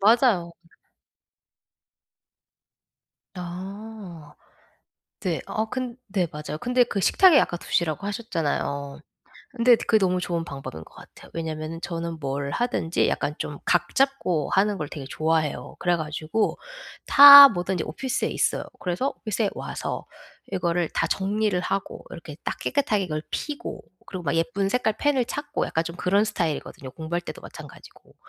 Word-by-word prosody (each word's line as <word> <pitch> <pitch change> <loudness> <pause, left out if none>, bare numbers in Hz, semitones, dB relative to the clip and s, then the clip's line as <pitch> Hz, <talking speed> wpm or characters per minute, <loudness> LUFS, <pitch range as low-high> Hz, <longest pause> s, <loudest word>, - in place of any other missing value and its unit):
맞아요. 215 -5 +4 2.8
아. 185 -2 -8 0.9
네. 180 -5 -2
어 220 - -1
근 255 -1 -4
네. 190 -3 0
맞아요. 150 0 -6
근데 245 0 +3
그 205 -4 -3
식탁에 350 - +6
아까 175 - 0
두시라고 170 +2 -1
하셨잖아요. 150 - -3 0.6
근데 240 0 +5
그게 220 -1 +2
너무 185 -2 +1
좋은 170 -2 -2
방법인 135 - -8
것 - - -20
같아요. - - -15
왜냐면은 160 0 -5
저는 170 -2 -4
뭘 140 0 -3
하든지 205 - 0
약간 150 - -1
좀 145 - -5
각 175 0 +1
잡고 265 - +1
하는 200 0 +2
걸 150 - -4
되게 145 -2 -7
좋아해요. 160 0 -1
그래 175 -1 +1
가지고 155 +6 -2 0.5
다 280 0 +12
뭐든지 180 -3 -2
오피스에 250 +11 -2
있어요. - - 0
그래서 180 +10 -1
오피스에 215 -1 -1
와서 - - -5 0.5
이거를 175 -3 0
다 - - 0
정리를 200 0 0
하고 195 +2 -4
이렇게 155 -3 -9
딱 - - -3
깨끗하게 215 -10 0
그걸 155 -1 -3
피고 295 -1 -5 0.2
그리고 185 -2 -7
막 145 - 0
예쁜 195 +3 0
색깔 220 -1 0
펜을 280 -4 +2
찾고 290 +3 -3
약간 160 - -1
좀 170 +1 -7
그런 200 +4 +2
스타일이거든요, 155 -8 -3
공부할 165 +2 -3
때도 - - -9
마찬가지고. - - -13
180 Hz, 315 characters per minute, -25 LUFS, 160-220 Hz, 2.8 s, 다